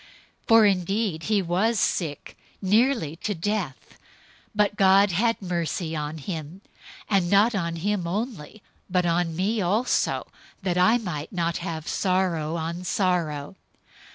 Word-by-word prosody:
002:027 -, -, -26 dB
For 225 Hz, -1 st, +7 dB
indeed 195 Hz, -2 st, 0 dB
he 210 Hz, -2 st, +2 dB
was 195 Hz, +6 st, +1 dB
sick, 155 Hz, -5 st, -2 dB, 0.2 s
nearly 210 Hz, -, +2 dB
to 205 Hz, +4 st, -3 dB
death, 180 Hz, -5 st, -4 dB, 0.6 s
but 210 Hz, 0 st, +2 dB
God 195 Hz, 0 st, +5 dB
had 225 Hz, +6 st, +1 dB
mercy 170 Hz, -2 st, -2 dB
on 150 Hz, +1 st, -4 dB
him; 160 Hz, +3 st, -6 dB, 0.5 s
and 190 Hz, -4 st, +2 dB
not 205 Hz, +5 st, +4 dB
on 170 Hz, -4 st, -2 dB
him 185 Hz, +1 st, -1 dB
only, 210 Hz, -, -4 dB, 0.3 s
but 180 Hz, -1 st, +1 dB
on 170 Hz, -1 st, 0 dB
me 205 Hz, +5 st, 0 dB
also, 210 Hz, +8 st, +1 dB, 0.4 s
that 180 Hz, -2 st, 0 dB
I 220 Hz, +6 st, +5 dB
might 175 Hz, -10 st, -5 dB
not 170 Hz, -2 st, -1 dB
have 170 Hz, -2 st, -5 dB
sorrow 180 Hz, -4 st, 0 dB
on 170 Hz, +2 st, -4 dB
sorrow. 175 Hz, -4 st, -1 dB
180 Hz, 135 wpm, -25 LUFS, 165-205 Hz, 0.6 s, For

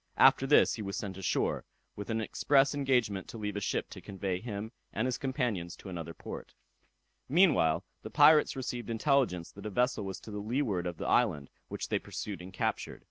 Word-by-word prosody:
After 135 Hz, -, +6 dB
this 145 Hz, -, +5 dB
he 110 Hz, -, -5 dB
was 100 Hz, -1 st, -4 dB
sent 95 Hz, -3 st, -4 dB
ashore, 95 Hz, -, 0 dB, 0.3 s
with 105 Hz, +1 st, -7 dB
an 110 Hz, 0 st, 0 dB
express 135 Hz, +5 st, +3 dB
engagement 125 Hz, -9 st, +1 dB
to -, -, -8 dB
leave 105 Hz, -2 st, -3 dB
a -, -, -1 dB
ship 100 Hz, -, -1 dB
to -, -, -9 dB
convey 95 Hz, -2 st, -3 dB
him 110 Hz, -1 st, -5 dB, 0.2 s
and 110 Hz, -, -1 dB
his 130 Hz, -1 st, -1 dB
companions 120 Hz, -, -2 dB
to 95 Hz, -, -10 dB
another 85 Hz, -2 st, -6 dB
port. -, -, -8 dB, 0.7 s
Meanwhile, 150 Hz, -, +4 dB, 0.2 s
the -, -, -7 dB
pirates 155 Hz, -2 st, +6 dB
received 125 Hz, -2 st, -4 dB
intelligence 115 Hz, -, +1 dB
that 100 Hz, +1 st, -8 dB
a -, -, -3 dB
vessel 125 Hz, +2 st, +1 dB
was 95 Hz, -1 st, -5 dB
to 110 Hz, -, -10 dB
the 105 Hz, -, -4 dB
leeward 105 Hz, -5 st, -1 dB
of 85 Hz, -2 st, -5 dB
the -, -, -5 dB
island, 85 Hz, -, +2 dB, 0.2 s
which -, -, -5 dB
they -, -, +1 dB
pursued 100 Hz, -3 st, -6 dB
and 90 Hz, +1 st, -9 dB
captured. 95 Hz, -, -2 dB
105 Hz, 195 wpm, -31 LUFS, 95-130 Hz, 0.7 s, After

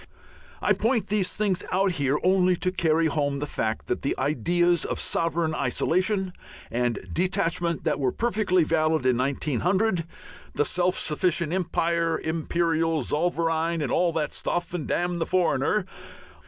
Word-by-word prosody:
I -, -, +4 dB
point 230 Hz, 0 st, 0 dB
these 200 Hz, -3 st, +1 dB
things 205 Hz, -4 st, +1 dB
out 190 Hz, +1 st, +2 dB
here 140 Hz, -3 st, 0 dB
only 185 Hz, -1 st, +3 dB
to 185 Hz, +1 st, -1 dB
carry 165 Hz, -3 st, +2 dB
home 145 Hz, -2 st, 0 dB
the 145 Hz, -, -3 dB
fact 110 Hz, -6 st, -3 dB
that -, -, -2 dB
the 140 Hz, -, -1 dB
ideas 175 Hz, +3 st, +1 dB
of -, -, -3 dB
sovereign 165 Hz, -1 st, 0 dB
isolation 185 Hz, -, 0 dB, 0.4 s
and 120 Hz, 0 st, 0 dB, 0.2 s
detachment 175 Hz, -2 st, 0 dB
that 155 Hz, -3 st, 0 dB
were 130 Hz, -2 st, +1 dB
perfectly 215 Hz, -6 st, +1 dB
valid 155 Hz, -3 st, +1 dB
in 125 Hz, -2 st, +3 dB
1900, 165 Hz, -, 0 dB, 0.5 s
the 145 Hz, -, +2 dB
self 180 Hz, +1 st, +1 dB
sufficient 170 Hz, +1 st, 0 dB
empire, 170 Hz, -2 st, 0 dB
Imperial 165 Hz, 0 st, 0 dB
Zollverein 165 Hz, 0 st, 0 dB
and 140 Hz, -, -2 dB
all 175 Hz, -1 st, +2 dB
that 155 Hz, -2 st, -2 dB
stuff, 175 Hz, 0 st, -2 dB
and 165 Hz, -5 st, -3 dB
damn 175 Hz, 0 st, -1 dB
the 165 Hz, -, -2 dB
foreigner! 180 Hz, +1 st, +1 dB
170 Hz, 145 wpm, -25 LUFS, 155-180 Hz, 0.5 s, I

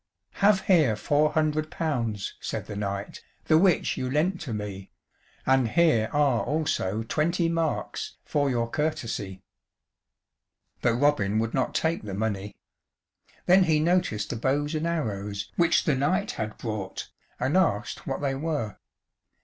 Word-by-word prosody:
"Have 200 Hz, -1 st, +5 dB
here 155 Hz, -, +4 dB
four 150 Hz, +7 st, +2 dB
hundred 155 Hz, 0 st, +1 dB
pounds," 120 Hz, -12 st, -2 dB
said -, -, -4 dB
the 105 Hz, -, -7 dB
knight, 100 Hz, 0 st, -4 dB, 0.2 s
"The 155 Hz, 0 st, +5 dB
which 180 Hz, -2 st, +2 dB
you 130 Hz, -, -2 dB
lent 165 Hz, +7 st, 0 dB
to 125 Hz, -, -5 dB
me; 100 Hz, -3 st, -5 dB, 0.6 s
And 130 Hz, -2 st, +3 dB
here 120 Hz, -5 st, +3 dB
are 140 Hz, -5 st, +2 dB
also 115 Hz, -9 st, -1 dB
twenty 165 Hz, +8 st, +1 dB
marks 165 Hz, -2 st, -2 dB
For 145 Hz, -2 st, +1 dB
your 120 Hz, -2 st, 0 dB
courtesie." 115 Hz, -9 st, -3 dB, 1.4 s
But 120 Hz, -1 st, +2 dB
Robin 120 Hz, -7 st, +2 dB
would 115 Hz, +1 st, 0 dB
not 130 Hz, -, 0 dB
take 165 Hz, +1 st, +1 dB
the 100 Hz, -3 st, -6 dB
money. 105 Hz, -1 st, -3 dB, 0.9 s
Then 185 Hz, +1 st, +6 dB
he 155 Hz, -2 st, +3 dB
noticed 155 Hz, -, +1 dB
the 120 Hz, -, -3 dB
bows 145 Hz, +6 st, 0 dB
and 155 Hz, +1 st, -1 dB
arrows 105 Hz, -11 st, -3 dB
which 170 Hz, -1 st, +3 dB
the 150 Hz, -, +2 dB
knight 180 Hz, +10 st, +1 dB
had 110 Hz, -1 st, -5 dB
brought, 105 Hz, -5 st, -5 dB, 0.3 s
and -, -, 0 dB
asked -, -, 0 dB
what -, -, -2 dB
they 140 Hz, -2 st, 0 dB
were. 140 Hz, -7 st, -3 dB
135 Hz, 145 wpm, -26 LUFS, 110-160 Hz, 1.4 s, Then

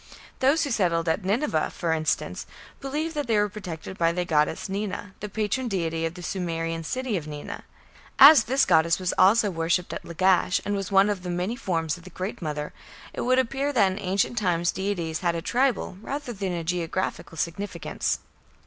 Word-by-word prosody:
Those 280 Hz, +5 st, +3 dB
who 285 Hz, -, -2 dB
settled 170 Hz, -6 st, +1 dB
at 165 Hz, +5 st, 0 dB
Nineveh, 200 Hz, -, 0 dB
for 165 Hz, -2 st, -1 dB
instance, 155 Hz, -1 st, -1 dB, 0.3 s
believed 300 Hz, +4 st, -3 dB
that 295 Hz, -3 st, -3 dB
they 225 Hz, -2 st, +2 dB
were 210 Hz, 0 st, +3 dB
protected 190 Hz, -3 st, -7 dB
by 165 Hz, 0 st, +3 dB
the 180 Hz, +1 st, -2 dB
goddess 155 Hz, +2 st, +1 dB
Nina, 200 Hz, 0 st, -4 dB
the 210 Hz, -, -5 dB
patron 215 Hz, +5 st, -1 dB
deity 165 Hz, -5 st, -1 dB
of 165 Hz, -, -8 dB
the 180 Hz, -, -9 dB
Sumerian 165 Hz, -2 st, -3 dB
city 255 Hz, +4 st, -2 dB
of 155 Hz, -3 st, -6 dB
Nina. 150 Hz, -1 st, -7 dB, 0.5 s
As 280 Hz, -3 st, +9 dB
this 265 Hz, +3 st, +3 dB
goddess 165 Hz, -1 st, +4 dB
was 185 Hz, -1 st, -1 dB
also 205 Hz, +2 st, +5 dB
worshipped 165 Hz, +1 st, 0 dB
at -, -, -6 dB
Lagash, 180 Hz, +1 st, +2 dB
and 205 Hz, -, 0 dB
was 195 Hz, 0 st, -4 dB
one 195 Hz, +1 st, +5 dB
of 205 Hz, -3 st, -1 dB
the 180 Hz, -, -6 dB
many 180 Hz, +6 st, -1 dB
forms 165 Hz, -, -2 dB
of 175 Hz, -, -15 dB
the 185 Hz, -, -11 dB
Great 190 Hz, +6 st, -5 dB
Mother, 150 Hz, -2 st, -4 dB, 0.4 s
it -, -, -4 dB
would 255 Hz, +1 st, +2 dB
appear 270 Hz, +3 st, 0 dB
that 205 Hz, -8 st, +3 dB
in 190 Hz, -, -5 dB
ancient 200 Hz, +5 st, 0 dB
times 175 Hz, -4 st, +1 dB
deities 180 Hz, -5 st, -2 dB
had 170 Hz, -2 st, 0 dB
a 165 Hz, -, -2 dB
tribal 240 Hz, -7 st, 0 dB
rather 280 Hz, +1 st, -4 dB
than 195 Hz, -3 st, -3 dB
a 170 Hz, -1 st, -3 dB
geographical 170 Hz, 0 st, -3 dB
significance. 175 Hz, +6 st, -2 dB
185 Hz, 195 wpm, -26 LUFS, 165-220 Hz, 0.5 s, As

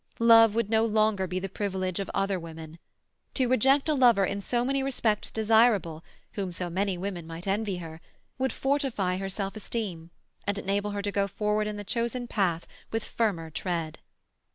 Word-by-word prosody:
Love 225 Hz, -2 st, +7 dB
would 230 Hz, -2 st, +1 dB
no 220 Hz, +1 st, +3 dB
longer 215 Hz, -3 st, +2 dB
be 180 Hz, -, -3 dB
the 190 Hz, +1 st, -2 dB
privilege 190 Hz, -2 st, -2 dB
of 195 Hz, -, -3 dB
other 195 Hz, -1 st, 0 dB
women. 160 Hz, -1 st, -9 dB, 0.6 s
To 260 Hz, -3 st, +2 dB
reject 270 Hz, +4 st, +3 dB
a 310 Hz, -, +3 dB
lover 240 Hz, -8 st, +5 dB
in 200 Hz, +2 st, -3 dB
so 240 Hz, +4 st, 0 dB
many 275 Hz, +1 st, +1 dB
respects 235 Hz, -6 st, 0 dB
desirable, 220 Hz, -7 st, +3 dB, 0.3 s
whom 195 Hz, -3 st, -3 dB
so 175 Hz, 0 st, -4 dB
many 190 Hz, +1 st, 0 dB
women 175 Hz, -3 st, -5 dB
might 165 Hz, +1 st, -8 dB
envy 200 Hz, -1 st, -1 dB
her, 165 Hz, -2 st, -8 dB, 0.4 s
would 265 Hz, 0 st, +1 dB
fortify 265 Hz, -10 st, 0 dB
her 195 Hz, 0 st, -3 dB
self 195 Hz, +1 st, -4 dB
esteem, 195 Hz, -6 st, -4 dB, 0.4 s
and 205 Hz, 0 st, 0 dB
enable 200 Hz, +1 st, -1 dB
her 205 Hz, 0 st, -3 dB
to 205 Hz, -, -1 dB
go 200 Hz, 0 st, +1 dB
forward 210 Hz, +2 st, 0 dB
in 210 Hz, 0 st, -4 dB
the 205 Hz, -, -5 dB
chosen 235 Hz, +3 st, -2 dB
path 180 Hz, -7 st, 0 dB, 0.3 s
with 225 Hz, -1 st, -1 dB
firmer 175 Hz, -8 st, -1 dB
tread. 165 Hz, -2 st, -3 dB
200 Hz, 180 wpm, -28 LUFS, 185-225 Hz, 0.6 s, Love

